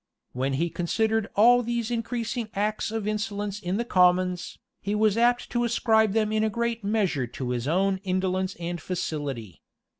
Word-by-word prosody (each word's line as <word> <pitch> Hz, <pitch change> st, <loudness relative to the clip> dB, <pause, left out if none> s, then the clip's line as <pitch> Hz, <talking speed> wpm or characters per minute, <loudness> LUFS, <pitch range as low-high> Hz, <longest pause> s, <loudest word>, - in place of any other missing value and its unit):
When 130 Hz, +2 st, -1 dB
he 165 Hz, +5 st, 0 dB
considered 220 Hz, +6 st, 0 dB
all 245 Hz, +4 st, +6 dB
these 235 Hz, -1 st, -2 dB
increasing 235 Hz, -1 st, -2 dB
acts 210 Hz, +2 st, -1 dB
of 220 Hz, -1 st, -3 dB
insolence 210 Hz, -1 st, -2 dB
in 185 Hz, 0 st, -2 dB
the 235 Hz, -, -1 dB
commons, 180 Hz, -2 st, +2 dB, 0.2 s
he 205 Hz, +2 st, -2 dB
was 215 Hz, -1 st, +3 dB
apt 240 Hz, +1 st, +2 dB
to 240 Hz, 0 st, +1 dB
ascribe 220 Hz, -3 st, +2 dB
them 215 Hz, -1 st, +1 dB
in 215 Hz, 0 st, +1 dB
a 220 Hz, -, +2 dB
great 235 Hz, +1 st, -2 dB
measure 200 Hz, -, 0 dB
to 125 Hz, +1 st, -5 dB
his 120 Hz, +1 st, -2 dB
own 190 Hz, +4 st, +2 dB
indolence 185 Hz, 0 st, -1 dB
and 170 Hz, -1 st, -5 dB
facility. 145 Hz, -, -4 dB
205 Hz, 170 wpm, -26 LUFS, 180-225 Hz, 0.2 s, all